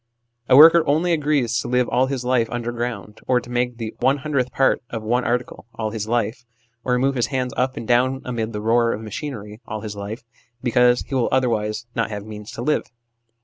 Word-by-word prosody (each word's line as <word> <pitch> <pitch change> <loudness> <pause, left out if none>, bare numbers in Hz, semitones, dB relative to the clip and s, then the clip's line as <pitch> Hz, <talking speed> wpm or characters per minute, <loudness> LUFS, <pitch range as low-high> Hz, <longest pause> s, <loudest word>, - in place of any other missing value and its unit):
A 130 - +7
worker 165 +3 +9
only 165 +4 +2
agrees 145 -6 +1
to - - -6
live 125 0 +2
all 125 +2 +2
his 130 -2 -3
life 125 -3 +2
under 120 0 -3
ground, 120 -3 -5
or 125 -1 +3
to 120 - -12
make 125 0 -1
the 115 -2 -5
one 130 +3 +3
hundredth 140 -3 -1
part 135 - +2
of 115 -2 -5
one 120 +3 +1
article 125 -1 -2
all 110 -1 -3
his 110 -1 -4
life, 115 +1 -1 0.4
or 125 -1 +1
move 135 +2 +2
his 120 -3 0
hands 130 -2 -2
up 130 +1 -1
and 115 - -6
down 130 +2 +2
amid 115 -3 -3
the 105 -2 -4
roar 115 +1 +2
of 105 - -5
machinery 110 -2 -7
all 110 0 -5
his 105 -1 -6
life, 105 +4 -6 0.4
because 125 0 +4
he - - -9
will 130 -3 +1
otherwise 115 -4 0
not 115 -1 -1
have 105 -1 -6
means 105 0 -9
to 120 - -5
live. 150 +3 0
120 Hz, 215 wpm, -22 LUFS, 110-130 Hz, 0.4 s, worker